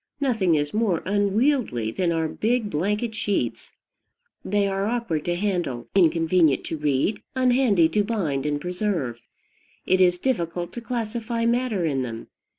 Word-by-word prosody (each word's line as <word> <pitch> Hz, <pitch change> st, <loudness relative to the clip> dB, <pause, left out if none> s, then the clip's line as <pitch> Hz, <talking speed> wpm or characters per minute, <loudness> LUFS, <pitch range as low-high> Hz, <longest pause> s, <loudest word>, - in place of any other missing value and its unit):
Nothing 220 Hz, -, +2 dB
is 145 Hz, -1 st, -1 dB
more 210 Hz, -6 st, +1 dB
unwieldy 205 Hz, -, +1 dB
than 175 Hz, +8 st, 0 dB
our 165 Hz, -1 st, 0 dB
big 220 Hz, +4 st, -1 dB
blanket 210 Hz, +8 st, -1 dB
sheets: 200 Hz, -, -2 dB, 0.7 s
they 205 Hz, 0 st, +1 dB
are 195 Hz, +1 st, -1 dB
awkward 225 Hz, -10 st, -2 dB
to 175 Hz, -, 0 dB
handle, 175 Hz, -, -2 dB
inconvenient 165 Hz, -4 st, +3 dB
to 160 Hz, -, -4 dB
read, 150 Hz, +7 st, 0 dB
unhandy 250 Hz, -9 st, +4 dB
to 210 Hz, +2 st, +2 dB
bind 160 Hz, -11 st, -1 dB
and 145 Hz, -1 st, -1 dB
preserve. 180 Hz, -, -2 dB, 0.6 s
It 185 Hz, 0 st, +3 dB
is 180 Hz, -1 st, +4 dB
difficult 175 Hz, -6 st, -2 dB
to 240 Hz, -, -6 dB
classify 230 Hz, -1 st, -3 dB
matter 235 Hz, -6 st, +1 dB
in 140 Hz, -4 st, 0 dB
them. 115 Hz, -2 st, -6 dB
190 Hz, 145 wpm, -24 LUFS, 160-225 Hz, 0.7 s, unhandy